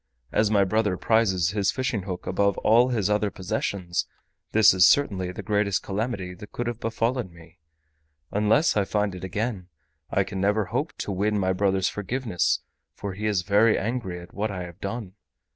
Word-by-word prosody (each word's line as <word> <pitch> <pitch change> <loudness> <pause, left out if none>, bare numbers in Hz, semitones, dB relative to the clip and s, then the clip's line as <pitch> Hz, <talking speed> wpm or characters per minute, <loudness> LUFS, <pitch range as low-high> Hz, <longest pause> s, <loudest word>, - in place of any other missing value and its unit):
As 105 0 +2
my 100 -2 +4
brother 105 -1 +1
prizes 95 -7 +2
his 100 -2 +1
fishing 130 -5 -1
hook 90 -1 -6
above 100 +1 +1
all 120 +3 +4
his 110 -6 0
other 105 0 +1
possessions, 95 -2 -2 0.4
this 110 -4 +6
is 95 -1 +6
the 95 -10 0
greatest 105 -2 +1
calamity 100 -3 -3
that 105 +3 -12
could 120 - -3
have 120 -1 -3
befallen 115 -1 -1
me. 85 0 -17 0.7
Unless 105 +10 +3
I 105 - +3
find 105 0 -1
it 90 - -8
again 100 0 -3 0.4
I 100 - +2
can 95 0 -5
never 105 +1 +2
hope - - -2
to - - -4
win 105 +3 0
my 95 -1 +1
brother's 95 0 +1
forgiveness, 105 -3 -1 0.3
for 100 -2 -5
he 105 +3 -3
is 100 -4 +1
very 105 +3 +4
angry 95 -5 -3
at 85 0 -13
what 110 +2 -2
I 95 -3 -4
have 85 +2 -11
done. 100 -1 -5
100 Hz, 175 wpm, -25 LUFS, 95-110 Hz, 0.7 s, this